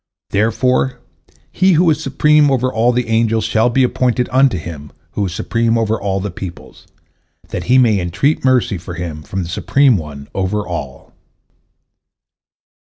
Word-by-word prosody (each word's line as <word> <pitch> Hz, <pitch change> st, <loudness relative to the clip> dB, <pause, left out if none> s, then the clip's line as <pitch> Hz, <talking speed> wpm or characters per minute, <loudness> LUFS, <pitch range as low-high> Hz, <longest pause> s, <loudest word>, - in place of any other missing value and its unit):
Therefore 125 Hz, +5 st, +1 dB, 0.5 s
he 190 Hz, 0 st, +3 dB
who 170 Hz, +2 st, +3 dB
is 150 Hz, -, -1 dB
supreme 150 Hz, +2 st, +3 dB
over 130 Hz, -1 st, 0 dB
all 115 Hz, +2 st, +2 dB
the 125 Hz, -1 st, -1 dB
angels 115 Hz, 0 st, +1 dB
shall 110 Hz, +2 st, +2 dB
be 130 Hz, +2 st, +2 dB
appointed 125 Hz, 0 st, 0 dB
unto 130 Hz, -4 st, +3 dB
him 75 Hz, -3 st, -8 dB, 0.2 s
who 100 Hz, -, -2 dB
is -, -, -5 dB
supreme 115 Hz, +6 st, 0 dB
over 110 Hz, -2 st, -1 dB
all 100 Hz, -1 st, -1 dB
the 100 Hz, 0 st, -4 dB
peoples, 90 Hz, -1 st, -10 dB, 0.6 s
that -, -, -5 dB
he 125 Hz, +2 st, +4 dB
may 115 Hz, -6 st, +4 dB
entreat 90 Hz, -, 0 dB
mercy 125 Hz, -8 st, +2 dB
for 90 Hz, +1 st, -8 dB
him 85 Hz, -3 st, -6 dB
from 95 Hz, +4 st, -4 dB
the 85 Hz, -, -7 dB
Supreme 120 Hz, +6 st, +2 dB
One 70 Hz, -4 st, -8 dB
over 100 Hz, +2 st, -2 dB
all." 75 Hz, -7 st, -7 dB
110 Hz, 155 wpm, -17 LUFS, 90-130 Hz, 0.6 s, he